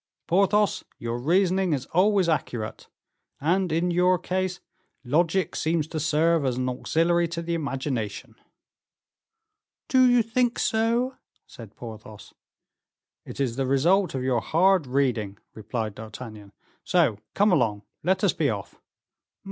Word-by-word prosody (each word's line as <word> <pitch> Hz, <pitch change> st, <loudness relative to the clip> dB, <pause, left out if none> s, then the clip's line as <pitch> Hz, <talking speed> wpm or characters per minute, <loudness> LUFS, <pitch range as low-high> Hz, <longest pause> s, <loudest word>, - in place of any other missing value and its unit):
"Porthos, 200 Hz, +3 st, +2 dB
your 115 Hz, +1 st, -4 dB
reasoning 185 Hz, +4 st, +2 dB
is 135 Hz, -3 st, -2 dB
always 190 Hz, +1 st, +3 dB
accurate, 120 Hz, -9 st, -3 dB, 0.5 s
and, 180 Hz, +4 st, +1 dB
in 170 Hz, +3 st, +1 dB
your 180 Hz, +1 st, +3 dB
case, 185 Hz, +1 st, -2 dB, 0.4 s
logic 165 Hz, +8 st, +1 dB
seems 160 Hz, -1 st, 0 dB
to 155 Hz, -, -3 dB
serve 160 Hz, +1 st, +2 dB
as 130 Hz, -2 st, -1 dB
an 130 Hz, 0 st, -1 dB
auxiliary 170 Hz, +7 st, +1 dB
to 170 Hz, 0 st, -5 dB
the 170 Hz, 0 st, -3 dB
imagination." 135 Hz, -8 st, -3 dB, 1.5 s
"Do 255 Hz, -2 st, +5 dB
you 245 Hz, -1 st, +4 dB
think 240 Hz, +2 st, 0 dB
so?" 235 Hz, +4 st, 0 dB, 0.3 s
said 110 Hz, -3 st, -13 dB
Porthos. 110 Hz, -2 st, -11 dB, 0.9 s
"It -, -, -9 dB
is 130 Hz, -3 st, -1 dB
the 135 Hz, -1 st, 0 dB
result 170 Hz, +7 st, +2 dB
of 130 Hz, -, -2 dB
your 125 Hz, -3 st, +1 dB
hard 180 Hz, +1 st, +3 dB
reading," 125 Hz, -7 st, 0 dB, 0.2 s
replied 110 Hz, 0 st, -4 dB
D'Artagnan. 110 Hz, -1 st, -10 dB, 0.3 s
"So 155 Hz, -, +2 dB, 0.2 s
come 205 Hz, +1 st, +4 dB
along, 110 Hz, -, +1 dB, 0.2 s
let 190 Hz, +3 st, 0 dB
us -, -, +3 dB
be -, -, 0 dB
off." -, -, -6 dB
160 Hz, 130 wpm, -25 LUFS, 125-185 Hz, 1.5 s, Do